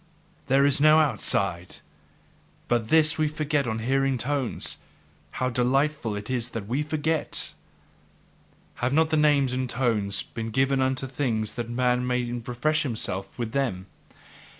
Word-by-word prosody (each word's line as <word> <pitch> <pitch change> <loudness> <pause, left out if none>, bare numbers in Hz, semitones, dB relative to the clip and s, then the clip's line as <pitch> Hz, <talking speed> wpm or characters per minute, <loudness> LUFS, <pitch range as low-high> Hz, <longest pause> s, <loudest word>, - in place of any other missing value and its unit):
There 135 +2 +4
is 145 0 +3
no 155 +1 +7
outside! 100 - 0 0.9
But 120 -2 0
this 155 +2 +3
we 155 - +3
forget 150 -2 -1
on 110 -1 -2
hearing 135 +3 +1
tones; 135 0 -1 0.6
how 130 0 -1
delightful 125 -1 0
it 105 0 -6
is 125 -2 -2
that 105 - -5
we 130 +6 0
forget! 155 +1 -1 1.2
Have 125 +2 -1
not 160 +1 +2
names 145 -4 +3
and 130 0 -2
tones 110 -6 0
been 115 -1 -6
given 135 +3 +1
unto 130 0 0
things 120 -5 -2
that 120 -2 -5
man 125 +1 +1
may 125 0 0
refresh 120 +6 -1
himself 110 -7 -4
with 120 -3 -3
them? 115 -10 -1
130 Hz, 140 wpm, -26 LUFS, 115-145 Hz, 1.2 s, no